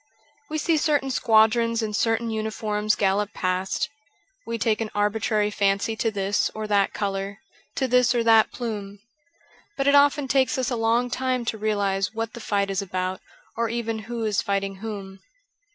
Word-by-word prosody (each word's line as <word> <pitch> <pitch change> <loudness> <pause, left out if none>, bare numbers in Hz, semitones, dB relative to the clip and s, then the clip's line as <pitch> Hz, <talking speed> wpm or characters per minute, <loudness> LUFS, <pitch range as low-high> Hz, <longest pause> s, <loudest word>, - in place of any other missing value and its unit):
We 310 - -2
see 320 +1 +2
certain 290 -3 +1
squadrons 230 0 +3
in 215 -1 -3
certain 225 +2 0
uniforms 215 -1 -1
gallop 200 +1 0
past; 185 0 -1 0.6
we 230 0 -2
take 220 0 0
an 220 - -2
arbitrary 210 0 +1
fancy 200 +2 +1
to 225 - +1
this 200 -1 0
or 215 0 -4
that 205 -2 +2
colour, 195 0 -3 0.4
to 265 - 0
this 250 -1 +3
or 235 - +2
that 225 -1 +5
plume. 205 -4 -5 0.8
But 275 - 0
it 280 - +4
often 285 0 +4
takes 265 0 +2
us 260 0 -1
a - - 0
long 235 +2 +1
time 255 -1 -1
to 225 - -1
realize 205 -1 0
what 225 0 -3
the 235 - -8
fight 200 -2 0
is 195 +1 -1
about 185 -1 -3 0.3
or 230 0 0
even 230 -1 -2
who 235 -1 -3
is 210 -2 +1
fighting 195 -1 -2
whom. 195 -2 -7
220 Hz, 170 wpm, -24 LUFS, 200-235 Hz, 0.8 s, that